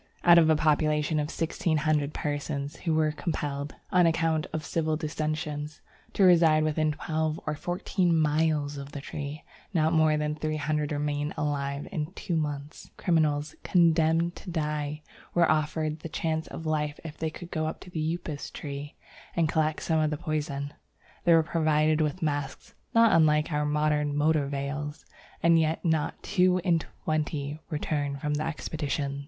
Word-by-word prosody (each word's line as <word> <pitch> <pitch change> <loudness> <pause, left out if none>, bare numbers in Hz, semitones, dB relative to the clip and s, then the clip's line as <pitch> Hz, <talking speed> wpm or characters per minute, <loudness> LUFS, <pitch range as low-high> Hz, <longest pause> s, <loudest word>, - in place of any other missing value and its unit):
Out 175 -1 +8
of 160 -1 +4
a 160 - +5
population 155 0 +2
of 150 0 -1
sixteen 165 -1 -1
hundred 150 -2 +1
persons 145 0 -3
who 165 -3 -1
were 155 -1 +3
compelled, 145 -3 -3 0.2
on 180 -2 +5
account 165 -1 +1
of 155 -1 -4
civil 160 -2 0
dissensions, 155 -1 -3 0.3
to 200 - +2
reside 165 -4 +6
within 155 0 +1
twelve 155 +1 -2
or 155 - -1
fourteen 175 +2 0
miles 150 -1 +1
of 140 0 -8
the 145 - -4
tree, 145 +1 -6 0.3
not 160 0 +3
more 155 -1 +4
than 150 0 -1
three 155 0 -2
hundred 150 0 -1
remained 145 0 -1
alive 140 -1 -2
in 155 -3 -3
two 180 -3 -3
months. 150 -1 -4
Criminals 155 -3 +1
condemned 165 -1 +3
to - - -9
die 150 -2 -2 0.3
were 170 -2 +5
offered 155 0 0
the 165 - -7
chance 160 0 -2
of 160 - -8
life 150 -2 -1
if 160 -2 -8
they 160 -1 -1
would 175 -1 -9
go 155 -1 -1
to 180 - -12
the 160 0 -1
Upas 155 -4 -6
tree 145 0 -7 0.4
and 165 -2 +3
collect 155 0 0
some 160 -1 +1
of 155 -1 +2
the 150 - -2
poison. 145 -2 -3 0.5
They 170 - +7
were 165 - +5
provided 155 -1 +2
with 155 +3 -1
masks 145 -2 -3 0.2
(not 230 0 +6
unlike 155 -1 +4
our 150 0 +1
modern 150 -1 +1
motor 150 -1 +2
veils), 145 +1 -4 0.4
and 170 -1 +6
yet 160 +2 0
not 160 -3 0
two 185 -2 +3
in 170 -3 +3
twenty 155 -2 -3
returned 145 -3 -2
from 150 +1 -1
the 150 +1 -1
expedition. 145 -3 -3
155 Hz, 165 wpm, -28 LUFS, 150-160 Hz, 0.5 s, Out